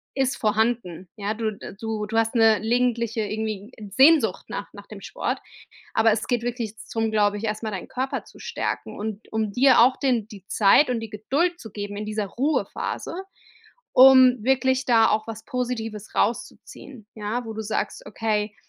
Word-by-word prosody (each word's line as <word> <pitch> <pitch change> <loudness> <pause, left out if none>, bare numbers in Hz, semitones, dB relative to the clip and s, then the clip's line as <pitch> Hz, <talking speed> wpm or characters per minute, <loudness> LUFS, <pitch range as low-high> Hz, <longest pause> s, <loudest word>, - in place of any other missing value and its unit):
ist 265 -1 0
vorhanden, 215 -5 -1
ja? 205 +1 -2
Du, 220 -1 -1
äh - - -9
du 220 -1 -3
du 225 - -2
hast 225 0 +2
'ne 225 -2 +5
gelegentliche 235 -1 0
irgendwie, 215 0 -4
äh, 210 -3 -9
Sehnsucht 285 - +4
nach - - -5
nach - - -12
dem - - -10
Sport, - - -3 0.6
aber 220 0 +4
es 215 - -2
geht 240 -2 0
wirklich 235 -3 -4
zum 225 0 -2
glaube 205 -1 +2
ich, 215 - -7
erstmal 215 0 -3
deinen 190 - -6
Körper 260 +1 -3
zu - - -17
stärken - - -4
und 215 0 -6
um 220 -2 -1
dir 260 +4 +5
auch 255 +2 +5
den 245 -6 0
die 200 -3 -12
Zeit 220 +7 +4
und 240 -2 -1
die 225 - -6
Geduld 285 - -1
zu 220 - -10
geben 205 0 -6
in 210 - -4
dieser 215 -1 -2
Ruhephase, 275 - -2 0.8
um 255 -3 +7
wirklich 260 0 +2
da 225 -2 +5
auch 215 +1 0
was 225 -1 -7
Positives 230 -5 -4
rauszuziehen, 230 +1 -3
ja? 220 +3 -3
Wo 225 - -6
du 220 - -5
sagst: 215 - -3
„Okay, 210 0 -2
225 Hz, 180 wpm, -24 LUFS, 210-250 Hz, 0.8 s, um